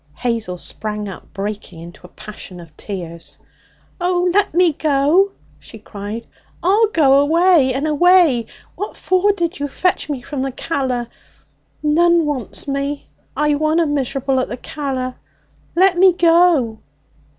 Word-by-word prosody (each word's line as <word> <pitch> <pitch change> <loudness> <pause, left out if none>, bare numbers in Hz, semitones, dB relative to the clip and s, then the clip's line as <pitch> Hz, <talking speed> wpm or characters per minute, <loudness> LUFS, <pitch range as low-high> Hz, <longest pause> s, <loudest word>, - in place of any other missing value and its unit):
Hazel 230 -7 -2
sprang 210 +3 -5
up, 190 - -10
breaking 200 -3 -6
into 175 +1 -12
a - - -25
passion 195 -3 -10
of 165 -2 -14
tears. 170 -5 -8 0.6
'Oh, 355 0 +1
let 410 +1 +2
me 345 -1 +3
go!' 310 +7 +2 0.3
she 225 - -13
cried. 210 +2 -7 0.4
'I'll 410 +5 +4
go 280 -8 +4
away 320 -1 +4
and 275 +3 -1
away! 310 -5 +4 0.3
What 415 - -6
for 375 +2 +2
did 345 -3 -3
you 285 - -2
fetch 360 +3 -1
me 270 -4 -4
from 280 0 -5
the 270 0 -2
Calla? 255 -4 -2 0.8
None 335 +2 +3
wants 285 -4 -3
me. 280 +1 -3 0.3
I 300 0 +2
wunna 310 +3 +1
miserable 275 -2 -1
at 255 - -1
the 240 - -6
Calla. 260 -2 -4 0.6
Let 365 0 +4
me 375 -1 +6
go!' 330 -10 +3
285 Hz, 140 wpm, -18 LUFS, 235-345 Hz, 0.8 s, me